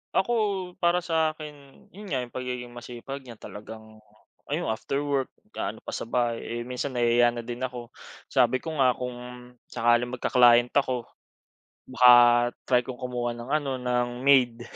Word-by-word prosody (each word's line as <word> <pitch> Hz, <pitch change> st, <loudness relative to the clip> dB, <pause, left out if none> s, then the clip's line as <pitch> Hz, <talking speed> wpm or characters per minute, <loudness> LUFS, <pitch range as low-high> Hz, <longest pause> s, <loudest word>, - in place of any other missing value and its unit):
Ako, 215 Hz, +5 st, +2 dB, 0.5 s
para 175 Hz, 0 st, +2 dB
sa 160 Hz, -2 st, +1 dB
akin 150 Hz, -1 st, -9 dB, 0.4 s
yun 205 Hz, +2 st, -11 dB
nga, 130 Hz, -6 st, -1 dB
yung 120 Hz, -, -11 dB
pagiging 125 Hz, -1 st, -5 dB
masipag 120 Hz, +3 st, -8 dB
niya 115 Hz, -, -9 dB
talagang, 110 Hz, +1 st, -11 dB, 0.5 s
ayun, -, -, -1 dB
after 140 Hz, +6 st, -3 dB
work, 140 Hz, -2 st, 0 dB, 0.2 s
gaano -, -, -5 dB
pa -, -, -7 dB
sa -, -, -5 dB
bahay. 120 Hz, -1 st, 0 dB
Eh, 120 Hz, 0 st, -5 dB
minsan 125 Hz, +2 st, -4 dB
nahihiya 120 Hz, 0 st, +3 dB
na 120 Hz, -, -5 dB
din 120 Hz, +1 st, -6 dB
ako. 125 Hz, -2 st, -5 dB, 0.4 s
Sabi 130 Hz, -1 st, +2 dB
ko 160 Hz, -, -4 dB
nga, 130 Hz, -2 st, +4 dB
kung 125 Hz, -1 st, -5 dB, 0.5 s
sakaling 120 Hz, +1 st, +1 dB
magka-client 120 Hz, -1 st, +4 dB
ako, 130 Hz, -4 st, 0 dB, 0.9 s
baka 125 Hz, -1 st, +7 dB, 0.6 s
try 125 Hz, -1 st, +4 dB
kong 130 Hz, -2 st, -7 dB
kumuha 120 Hz, -1 st, -2 dB
ng 120 Hz, +3 st, -9 dB
ano 145 Hz, -2 st, 0 dB
ng 125 Hz, -1 st, 0 dB, 0.2 s
maid. 125 Hz, -4 st, +4 dB
125 Hz, 160 wpm, -26 LUFS, 120-135 Hz, 0.9 s, baka